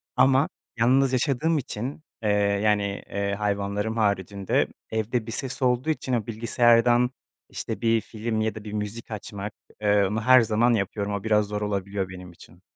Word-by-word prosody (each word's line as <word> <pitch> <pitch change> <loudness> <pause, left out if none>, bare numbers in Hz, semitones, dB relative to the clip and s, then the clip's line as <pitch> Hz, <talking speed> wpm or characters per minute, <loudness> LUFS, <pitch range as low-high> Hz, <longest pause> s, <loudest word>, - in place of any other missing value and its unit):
Ama 130 +3 +4 0.3
yalnız 130 +3 +3
yaşadığım 145 +5 +1
için, 130 +3 -4 0.2
eee, 105 - +1 0.3
yani, 105 -1 +3 0.3
eee, 100 0 -1
hayvanlarım 105 +1 -1
haricinde 100 -2 +1 0.2
evde 110 +1 -1
bir - - -4
ses 130 +3 -4
olduğu 125 +3 +1
için 135 -4 -1
o 115 -4 0
bilgisayardan, 120 +2 +3 0.4
işte, - - -5
bir 115 -1 +3
film 110 0 -3
ya 110 0 -1
da 110 - -8
bir 105 -1 -7
müzik 105 +2 -5
açmak, 105 -1 -6 0.3
eee, 105 -1 +3
onu 105 +3 -1
her 130 +2 +7
zaman 115 +2 +2
yapıyorum. 100 0 -1
O 100 0 -3
biraz 105 -1 +3
zor 105 0 -3
olabiliyor 100 -2 -2
benim 90 -1 -9
için. 85 +1 -17
110 Hz, 165 wpm, -25 LUFS, 100-120 Hz, 0.4 s, her